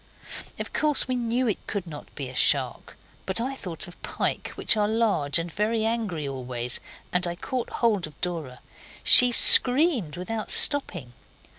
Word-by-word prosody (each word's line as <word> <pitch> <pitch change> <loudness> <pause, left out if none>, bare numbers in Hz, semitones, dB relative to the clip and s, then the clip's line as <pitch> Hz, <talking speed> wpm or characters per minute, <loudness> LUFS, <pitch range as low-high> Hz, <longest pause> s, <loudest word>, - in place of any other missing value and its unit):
Of - - -7
course 300 -4 +1
we 255 - -3
knew 240 +1 -2
it 215 - -5
could 200 -3 -5
not 150 -4 -12
be 140 -3 -7
a 130 - -11
shark, - - -1 0.3
but 190 +3 0
I 255 +4 -4
thought 180 - -9
of 175 - -16
pike, - - -4
which - - +2
are 210 -1 -1
large 210 -11 -1
and 170 0 -5
very 220 +4 -2
angry 215 -10 -4
always, 125 -2 -5 0.3
and 180 0 0
I 175 - -5
caught 250 +7 -6
hold 210 -8 -2
of 150 - -19
Dora. 160 -8 -6 0.4
She 250 0 +6
screamed 250 - +7
without 215 +4 -6
stopping. 205 - +1
200 Hz, 165 wpm, -24 LUFS, 155-235 Hz, 0.4 s, screamed